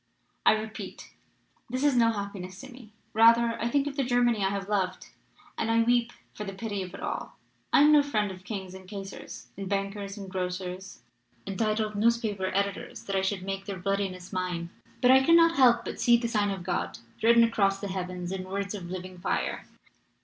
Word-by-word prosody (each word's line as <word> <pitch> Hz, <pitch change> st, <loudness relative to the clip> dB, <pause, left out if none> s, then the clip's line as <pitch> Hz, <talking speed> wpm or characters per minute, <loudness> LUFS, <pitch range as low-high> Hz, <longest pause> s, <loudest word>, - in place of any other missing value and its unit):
I -, -, +8 dB
repeat, 215 Hz, 0 st, -6 dB, 0.6 s
this 255 Hz, +3 st, -2 dB
is 290 Hz, -3 st, +4 dB
no 230 Hz, -2 st, +5 dB
happiness 200 Hz, -3 st, -6 dB
to 265 Hz, -, -10 dB
me. 240 Hz, -4 st, -13 dB, 0.2 s
Rather, 230 Hz, +1 st, +5 dB
I 235 Hz, -, 0 dB
think 280 Hz, +2 st, +2 dB
of 290 Hz, 0 st, -5 dB
the 275 Hz, -, +2 dB
Germany 240 Hz, -4 st, +2 dB
I 195 Hz, -, +2 dB
have 195 Hz, 0 st, -3 dB
loved, 190 Hz, -3 st, -1 dB, 0.5 s
and 225 Hz, -, 0 dB
I 230 Hz, 0 st, +4 dB
weep 240 Hz, 0 st, +2 dB, 0.2 s
for 210 Hz, -, -6 dB
the 195 Hz, -1 st, -6 dB
pity 205 Hz, -1 st, -3 dB
of 185 Hz, 0 st, -7 dB
it -, -, -9 dB
all. -, -, -4 dB, 0.3 s
I -, -, +6 dB
am 300 Hz, +1 st, +7 dB
no 300 Hz, -1 st, +7 dB
friend 215 Hz, -8 st, 0 dB
of 185 Hz, 0 st, -11 dB
kings 190 Hz, -1 st, -6 dB
and 190 Hz, -1 st, -11 dB
kaisers 195 Hz, -1 st, -8 dB
and 195 Hz, -1 st, -6 dB
bankers 200 Hz, 0 st, -3 dB
and 200 Hz, -1 st, -7 dB
grocers 185 Hz, 0 st, -5 dB, 0.4 s
and 195 Hz, -, -4 dB
titled 215 Hz, -1 st, 0 dB
news 230 Hz, +3 st, +3 dB
paper 205 Hz, -5 st, -2 dB
editors, 200 Hz, +1 st, -2 dB
that 195 Hz, -, -3 dB
I 190 Hz, -, +2 dB
should 190 Hz, -1 st, -1 dB
make 195 Hz, 0 st, -4 dB
their 200 Hz, -2 st, -5 dB
bloodiness 190 Hz, -1 st, -2 dB
mine. 180 Hz, -2 st, -3 dB, 0.3 s
But 250 Hz, -, +6 dB
I 265 Hz, 0 st, +7 dB
cannot 335 Hz, +2 st, +6 dB
help 245 Hz, -3 st, +5 dB
but -, -, -5 dB
see 240 Hz, -1 st, +6 dB
the 235 Hz, 0 st, -2 dB
sign 210 Hz, -3 st, +1 dB
of 195 Hz, -3 st, -4 dB
God 180 Hz, -, -2 dB, 0.2 s
written 235 Hz, +1 st, +6 dB
across 200 Hz, -4 st, +2 dB
the 200 Hz, -, -4 dB
heavens 180 Hz, -1 st, -4 dB
in 190 Hz, -1 st, -4 dB
words 200 Hz, +1 st, -3 dB
of 185 Hz, -4 st, -6 dB
living 185 Hz, 0 st, -7 dB
fire. 175 Hz, -, -2 dB
200 Hz, 205 wpm, -28 LUFS, 190-230 Hz, 0.6 s, I